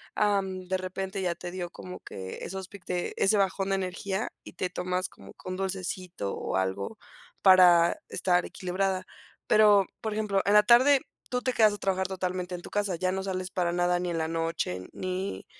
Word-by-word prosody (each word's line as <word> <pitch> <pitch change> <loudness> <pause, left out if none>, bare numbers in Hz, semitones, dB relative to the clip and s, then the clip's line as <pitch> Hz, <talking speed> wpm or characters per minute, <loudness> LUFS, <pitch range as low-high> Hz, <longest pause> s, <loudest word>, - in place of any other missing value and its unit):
am, 195 -3 0
de 190 - +1
repente 190 +1 -4
ya 175 -2 0
te 175 +1 -7
dio 180 -1 -4
como 180 +1 -9
que 95 -1 -8
esos 190 0 -5
pic 200 -2 -13
de 175 -1 -2
ese 195 - +4
bajón 195 0 +1
de 195 - +2
energía, 190 +3 -2 0.2
y - - -10
te 185 - -2
tomas 180 +1 -2
como - - -14
que - - -10
un 185 - -3
dulcecito 185 - -3
o - - -3
algo 95 - -1 0.4
para 180 -3 +7
estar 180 -1 +1
equilibrada. 185 +1 -2 0.4
Pero, 210 -2 +6 0.2
por 220 -1 -2
ejemplo, 210 -2 +1
¿en 205 - +3
la 210 0 +7
tarde 255 +5 +6 0.3
tú 250 0 -1
te 255 - 0
quedas 215 -3 +5
a - - -5
trabajar 190 -1 0
totalmente 185 -1 -3
en 175 - -7
tu - - -10
casa, 205 -3 0
ya 185 +2 0
no 190 0 -2
sales 185 -1 -3
para 175 -2 0
nada, 175 0 +2
ni 180 0 -2
en 165 - -2
la 160 - 0
noche 165 - -2
ni 185 +1 -4
185 Hz, 200 wpm, -28 LUFS, 180-195 Hz, 0.4 s, para